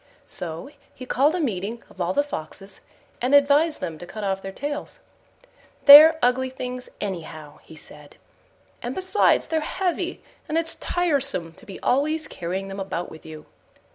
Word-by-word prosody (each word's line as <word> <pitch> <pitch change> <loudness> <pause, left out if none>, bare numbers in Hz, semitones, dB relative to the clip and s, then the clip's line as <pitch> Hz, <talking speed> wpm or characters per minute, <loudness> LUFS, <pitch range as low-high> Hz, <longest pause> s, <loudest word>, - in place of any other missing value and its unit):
So 165 +2 -7 0.3
he 255 - -9
called 285 +6 +2
a - - -2
meeting 225 - -3
of 190 - -11
all 175 +1 0
the 285 - +1
Foxes, 195 - -8 0.4
and 255 +4 +3
advised 290 +3 +3
them 160 -2 -5
to 175 - -9
cut 215 +3 -7
off 195 -1 -1
their 195 - -7
tails: 290 +7 -5 0.9
"They're 310 +3 +11
ugly 255 +1 +2
things 250 -1 -6
anyhow," 155 -6 -7
he 160 - -15
said, 150 -1 -14 0.7
"and - - -5
besides 375 +2 +2
they're 320 - +1
heavy, 360 +2 -3 0.3
and 310 - 0
it's 330 0 +1
tiresome 275 - -1
to 190 - -18
be 195 - -9
always 310 +4 0
carrying 185 +3 -5
them 195 0 -7
about 190 -2 -4
with 160 - -13
you." 155 -1 -10
245 Hz, 165 wpm, -23 LUFS, 180-295 Hz, 0.9 s, They're